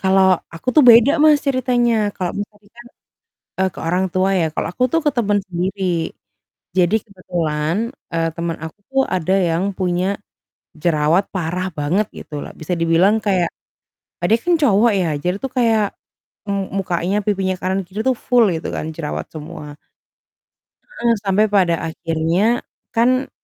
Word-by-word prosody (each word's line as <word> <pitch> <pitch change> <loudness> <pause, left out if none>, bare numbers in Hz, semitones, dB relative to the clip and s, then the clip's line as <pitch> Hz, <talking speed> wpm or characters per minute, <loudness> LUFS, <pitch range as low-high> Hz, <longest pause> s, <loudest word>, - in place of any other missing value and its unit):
Kalau 190 0 +4 0.3
aku 165 +9 -9
tuh 305 - +8
beda, 235 +4 +7
Mas, 305 -1 +6
ceritanya. 250 -3 +2 0.2
Kalau, 180 -2 -2
Mas, 205 - -3
tadi 205 0 -25
kan, 240 0 -13 0.7
eee, 190 0 +2
ke - - -8
orang 180 +2 +1
tua 185 +1 +2
ya, - - +2
kalau - - -2
aku 250 - 0
tuh 330 - +3
ke 295 - +5
temen 205 -3 +2
sendiri. 185 +2 -3 1.0
Jadi 175 +3 +3
kebetulan, 170 -5 -2 0.4
eee, 165 0 +1
teman 170 -1 -2
aku 160 +5 -9
tuh 270 0 +2 0.2
ada 185 +1 0 0.2
yang 165 +3 0
punya 180 0 0 0.8
jerawat 165 +2 +2
parah 180 +1 -2
banget 175 +9 +1
gitu - - -10
loh. - - -8
Bisa 165 +3 -2
dibilang 165 +5 +4
kayak 180 -4 +2 0.7
eee, - - +2
dia 225 - +5
kan 350 - +3
cowok 225 -2 +4
ya, 180 - +1 0.2
jadi 180 +1 0
tuh 265 - -3
kayak 225 -3 +3 0.6
m - - 0 0.3
mukanya, 180 0 -1
pipinya 190 -2 0
kanan 190 +1 0
kiri 195 +4 -6
tuh 260 - +2
full 245 -1 +5
gitu 160 - -4
kan - - -3
jerawat 155 -3 -4
semua. 150 -1 -8 1.1
Heeh. 240 - 0
Sampai 200 +2 +3
pada 185 -4 +3 0.2
akhirnya, 165 +9 0 0.3
kan, 255 +3 +2
190 Hz, 160 wpm, -19 LUFS, 170-225 Hz, 1.1 s, tuh